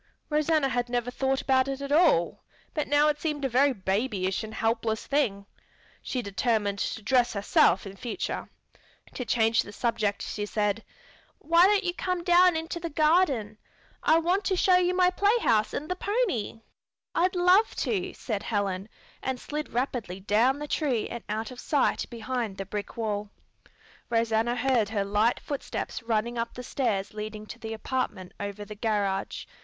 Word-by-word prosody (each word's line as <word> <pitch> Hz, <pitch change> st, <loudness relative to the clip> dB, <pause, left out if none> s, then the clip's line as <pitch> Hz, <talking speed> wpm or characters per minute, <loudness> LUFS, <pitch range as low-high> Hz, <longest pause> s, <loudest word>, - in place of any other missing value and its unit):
Rosanna 305 Hz, -1 st, +2 dB
had 245 Hz, -1 st, -1 dB
never 245 Hz, 0 st, -1 dB
thought 265 Hz, +1 st, 0 dB
about 260 Hz, -1 st, +3 dB
it 270 Hz, 0 st, -3 dB
at 280 Hz, 0 st, -5 dB
all, 300 Hz, -, +3 dB, 0.3 s
but 300 Hz, -, -1 dB
now 290 Hz, +1 st, +4 dB
it 295 Hz, -1 st, 0 dB
seemed 300 Hz, -3 st, -2 dB
a -, -, +3 dB
very 270 Hz, +4 st, +4 dB
babyish 195 Hz, -2 st, -1 dB
and 220 Hz, -, -7 dB
helpless 225 Hz, -1 st, -1 dB
thing. 215 Hz, -9 st, 0 dB, 0.6 s
She 250 Hz, -2 st, -3 dB
determined 205 Hz, -1 st, 0 dB
to 220 Hz, -, -3 dB
dress 245 Hz, +1 st, +3 dB
herself 200 Hz, -2 st, +3 dB
in 195 Hz, 0 st, -8 dB
future. 235 Hz, +4 st, -4 dB, 0.6 s
To 250 Hz, -, -4 dB
change 225 Hz, -1 st, +2 dB
the 205 Hz, -, -9 dB
subject 210 Hz, -2 st, -1 dB
she 205 Hz, 0 st, -4 dB
said, 210 Hz, +1 st, 0 dB, 0.5 s
"Why 335 Hz, +3 st, +5 dB
don't 410 Hz, 0 st, +3 dB
you 350 Hz, -1 st, -1 dB
come 365 Hz, -1 st, -2 dB
down 355 Hz, -1 st, +5 dB
into 325 Hz, +2 st, -4 dB
the 335 Hz, 0 st, -4 dB
garden? 305 Hz, -, +2 dB, 0.4 s
I 320 Hz, -, +4 dB
want 355 Hz, +5 st, +1 dB
to 380 Hz, -, +1 dB
show 370 Hz, 0 st, +4 dB
you 360 Hz, 0 st, +2 dB
my 365 Hz, 0 st, +4 dB
playhouse 400 Hz, -, +2 dB
and 300 Hz, -, -4 dB
the 365 Hz, -, -2 dB
pony." 400 Hz, -, -1 dB, 0.5 s
"I'd 365 Hz, +2 st, +2 dB
love 360 Hz, +5 st, +4 dB
to," 375 Hz, -3 st, -1 dB
said 215 Hz, -5 st, -3 dB
Helen, 200 Hz, -2 st, -2 dB, 0.3 s
and 260 Hz, -1 st, -2 dB
slid 300 Hz, +3 st, -5 dB
rapidly 240 Hz, -7 st, -2 dB
down 220 Hz, +7 st, +2 dB
the 295 Hz, +1 st, -5 dB
tree 270 Hz, -8 st, 0 dB
and 235 Hz, -, -6 dB
out 215 Hz, +2 st, -3 dB
of 250 Hz, -, -10 dB
sight 290 Hz, -4 st, +1 dB
behind 235 Hz, -3 st, -3 dB
the 195 Hz, -, -4 dB
brick 205 Hz, +3 st, -6 dB
wall. 210 Hz, -2 st, -2 dB, 0.8 s
Rosanna 230 Hz, 0 st, +1 dB
heard 245 Hz, -4 st, +2 dB
her 205 Hz, -2 st, -1 dB
light 210 Hz, +4 st, +2 dB
footsteps 285 Hz, -2 st, -4 dB
running 230 Hz, +1 st, -1 dB
up 230 Hz, 0 st, -3 dB
the 250 Hz, -, -6 dB
stairs 215 Hz, -7 st, -1 dB
leading 215 Hz, 0 st, -6 dB
to 235 Hz, -, -10 dB
the 225 Hz, -1 st, -5 dB
apartment 220 Hz, -6 st, -3 dB
over 205 Hz, 0 st, -5 dB
the 210 Hz, -, -8 dB
garage. 205 Hz, -3 st, -1 dB
240 Hz, 170 wpm, -27 LUFS, 210-300 Hz, 0.8 s, Why